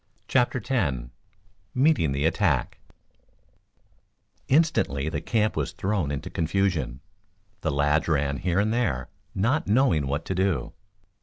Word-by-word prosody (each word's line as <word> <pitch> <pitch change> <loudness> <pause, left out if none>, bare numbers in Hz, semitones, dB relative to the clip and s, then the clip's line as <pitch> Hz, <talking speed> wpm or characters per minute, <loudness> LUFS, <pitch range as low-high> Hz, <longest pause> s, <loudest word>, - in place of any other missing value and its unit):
CHAPTER 125 -1 +2
X 110 - +1 0.8
MEETING 130 - +3
THE 70 +2 0
ATTACK 80 - +1 1.7
Instantly 130 - +2
the 75 - -3
camp 110 +4 0
was 75 -3 -2
thrown 95 -6 -1
into 70 -1 -4
confusion. 80 -7 -1 0.6
The - - -1
lads 75 +2 +1
ran 70 -3 +1
here 90 +3 -1
and 105 +2 +1
there, 90 - -1 0.3
not 120 +11 +1
knowing 100 - +3
what 70 +4 -2
to - - -2
do. 95 -8 0
85 Hz, 125 wpm, -26 LUFS, 70-110 Hz, 1.7 s, MEETING